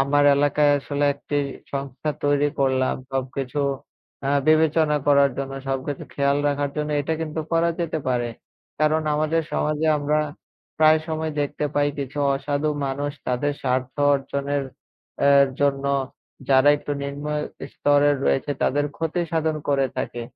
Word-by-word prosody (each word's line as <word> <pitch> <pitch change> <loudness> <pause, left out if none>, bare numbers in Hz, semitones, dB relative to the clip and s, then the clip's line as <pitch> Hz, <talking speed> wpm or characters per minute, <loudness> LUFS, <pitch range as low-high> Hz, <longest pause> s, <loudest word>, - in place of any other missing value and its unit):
আমার 145 +1 +3
এলাকায় 145 0 +3
আসলে 145 +1 -2
একটি 145 +1 -4 0.4
সংস্থা 140 +2 -3
তৈরি 145 0 +3
করলাম। 130 -1 +2 0.2
সবকিছু 135 +1 -2 0.7
আ - - 0 0.2
বিবেচনা 155 -1 +4
করার 140 -1 +5
জন্য, 135 0 -3 0.2
সবকিছু 135 +1 -3
খেয়াল 140 0 +2
রাখার 145 0 -1
জন্য 150 0 -2
এটা 155 +3 -1
কিন্তু 160 0 -3
করা 165 +1 +3
যেতে 160 -2 -1
পারে। 120 -1 0 0.5
কারণ 155 +1 +3
আমাদের 155 +2 +1
সমাজে 150 +1 0
আমরা 150 +1 +1 0.6
প্রায় 155 0 +6
সময় 160 -1 -2
দেখতে 145 +1 -2
পাই 145 0 +3
কিছু 140 +1 -5 0.2
অসাধু 145 +2 -1 0.2
মানুষ 140 +2 -2 0.2
তাদের 135 +4 0
স্বার্থ 130 0 -1 0.2
অর্জনের 140 +1 -2 0.6
অ্যা 140 - +5 0.3
জন্য 140 -1 +1 0.6
যারা 135 +1 +5
একটু 145 0 -5
নিম্ন 140 +1 -5 0.5
স্তরে 145 0 +3
রয়েছে 135 - +1
তাদের 145 +2 +2
ক্ষতি 165 +2 -1
সাধন 160 -1 0
করে 135 -1 +3
থাকে। 120 - -3
145 Hz, 140 wpm, -23 LUFS, 140-150 Hz, 0.7 s, প্রায়